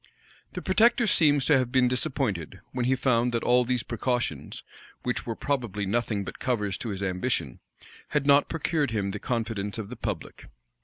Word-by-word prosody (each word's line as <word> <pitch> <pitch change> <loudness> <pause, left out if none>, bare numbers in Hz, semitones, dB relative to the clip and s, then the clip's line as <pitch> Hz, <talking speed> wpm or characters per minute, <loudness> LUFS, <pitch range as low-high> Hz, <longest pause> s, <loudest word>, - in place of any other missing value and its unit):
The - - -5
protector 235 +1 +4
seems 145 - +4
to 145 -4 +5
have 125 -1 -1
been 130 -1 +4
disappointed, 125 - -1
when 125 -1 -1
he 130 +1 +3
found 125 -2 +2
that 115 - -1
all 125 +1 +4
these 125 -1 -1
precautions, 120 +1 -2 0.4
which 125 0 -2
were 115 - -2
probably 120 -8 -2
nothing 105 0 -1
but 95 - -8
covers 105 -7 -1
to 115 - -4
his 100 -1 -4
ambition, 95 - -1 0.5
had 150 -2 0
not 140 0 +5
procured 160 -3 0
him 100 -3 -1
the 105 - -5
confidence 110 -4 -2
of 105 -3 -5
the 125 - -6
public. - - -5
120 Hz, 175 wpm, -27 LUFS, 105-130 Hz, 0.5 s, to